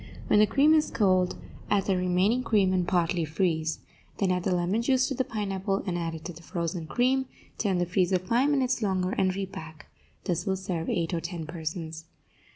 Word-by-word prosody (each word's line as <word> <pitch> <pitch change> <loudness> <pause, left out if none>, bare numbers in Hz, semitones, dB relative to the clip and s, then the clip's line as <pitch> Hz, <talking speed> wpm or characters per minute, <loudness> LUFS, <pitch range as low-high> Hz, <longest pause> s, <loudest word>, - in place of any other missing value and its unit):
When 210 - +4
the 215 - +6
cream 290 +6 +4
is 310 -1 +3
cold, 185 -4 +2 0.3
add 200 -2 +2
the 195 - +2
remaining 185 +6 +2
cream, 205 -6 +2
and 180 -2 +1
partly 175 -1 +1
freeze. 160 0 -1 0.4
Then 195 -2 +1
add 180 0 +1
the 180 0 0
lemon 180 +6 +1
juice 260 +1 +2
to - - -1
the 260 - 0
pineapple 195 -3 -2
and 185 -3 -2
add 165 -1 -2
it 160 - -10
to 175 - -5
the 165 - -13
frozen 170 0 -4
cream; 260 +6 +1 0.3
turn 195 -4 +1
the 175 - +1
freezer 180 +1 +2
five 235 +10 +1
minutes 260 -3 +1
longer, 190 -3 0
and 185 -2 +1
repack. 160 -5 -7 0.3
This 175 -1 -2
will 190 0 +1
serve 180 -4 -3
eight 170 0 -1
or 165 - -1
ten 170 -1 -5
persons. 160 0 -5
185 Hz, 200 wpm, -27 LUFS, 170-210 Hz, 0.4 s, the